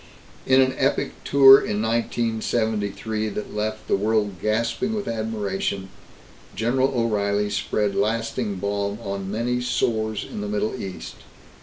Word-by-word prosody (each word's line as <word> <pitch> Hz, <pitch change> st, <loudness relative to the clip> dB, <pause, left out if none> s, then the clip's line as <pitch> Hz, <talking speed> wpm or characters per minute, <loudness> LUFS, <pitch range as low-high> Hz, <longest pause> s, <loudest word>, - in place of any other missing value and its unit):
In 130 Hz, 0 st, +6 dB
an 130 Hz, 0 st, +2 dB
epic 135 Hz, +1 st, +1 dB
tour 135 Hz, -1 st, +8 dB
in 105 Hz, -, -2 dB
1973 110 Hz, -1 st, -1 dB
that 105 Hz, 0 st, -6 dB
left 110 Hz, +1 st, -3 dB
the -, -, +3 dB
world 105 Hz, -2 st, 0 dB
gasping 115 Hz, -, 0 dB
with 210 Hz, -, -4 dB
admiration, 105 Hz, -4 st, -2 dB, 0.7 s
General 130 Hz, +5 st, +1 dB
O'Reilly 105 Hz, -2 st, 0 dB
spread 105 Hz, 0 st, 0 dB
lasting 115 Hz, 0 st, -1 dB
balm 100 Hz, +1 st, -2 dB
on 100 Hz, -1 st, -4 dB
many 120 Hz, +4 st, -1 dB
sores 110 Hz, -3 st, -1 dB
in 105 Hz, -, -6 dB
the 105 Hz, -, -4 dB
Middle 105 Hz, +1 st, -1 dB
East. 95 Hz, -2 st, -7 dB
110 Hz, 130 wpm, -23 LUFS, 105-115 Hz, 0.7 s, tour